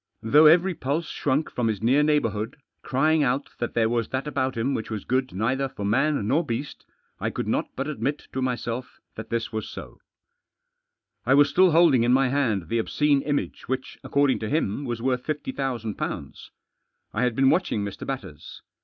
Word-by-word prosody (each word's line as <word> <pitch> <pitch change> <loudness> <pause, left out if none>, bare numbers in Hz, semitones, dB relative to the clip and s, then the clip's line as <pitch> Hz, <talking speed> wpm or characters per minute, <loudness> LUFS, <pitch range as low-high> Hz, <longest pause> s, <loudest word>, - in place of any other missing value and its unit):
Though 150 +8 +6
every 180 +4 +5
pulse 150 +2 -2
shrunk 145 +2 -1
from 120 -2 -1
his 110 -3 -1
near 130 +6 +4
neighbourhood, 120 -6 0 0.2
crying 155 +4 +2
out 135 +1 0
that 120 - -3
there 115 -1 +3
was 115 -1 0
that 130 +2 -2
about 130 -3 -2
him 125 +5 0
which 110 - -3
was 110 -3 -5
good 130 0 0
neither 130 +7 -1
for 100 - -6
man 135 +1 +1
nor 145 +8 +2
beast, 120 +3 -5 0.3
I - - -1
could - - -4
not - - 0
but 135 +2 -3
admit 150 -1 -3
to 130 - -2
myself 125 -1 -3
that 110 +1 -8
this 115 -1 -2
was 110 -1 -3
so* - - -10 1.2
I 130 +3 +4
was 145 +1 +5
Still 185 0 +5
holding 160 -7 +5
in 120 +1 +3
my 135 0 +3
hand 120 -10 0
the 115 0 0
obscene 145 +4 +2
iftiage 145 0 -3
which, 130 0 -4
according 140 -1 +2
to 110 - -4
him> 145 -3 -1
was 120 -2 -4
worth 125 -1 0
fifty 150 -2 -3
thousand 120 -6 -3
pounds* - - -5 0.6
I 110 - -1
had 125 -2 +1
been 135 +1 +4
watching 145 - 0
Mr. 100 - -7
Batters. 95 - -7
130 Hz, 190 wpm, -25 LUFS, 115-145 Hz, 1.2 s, Though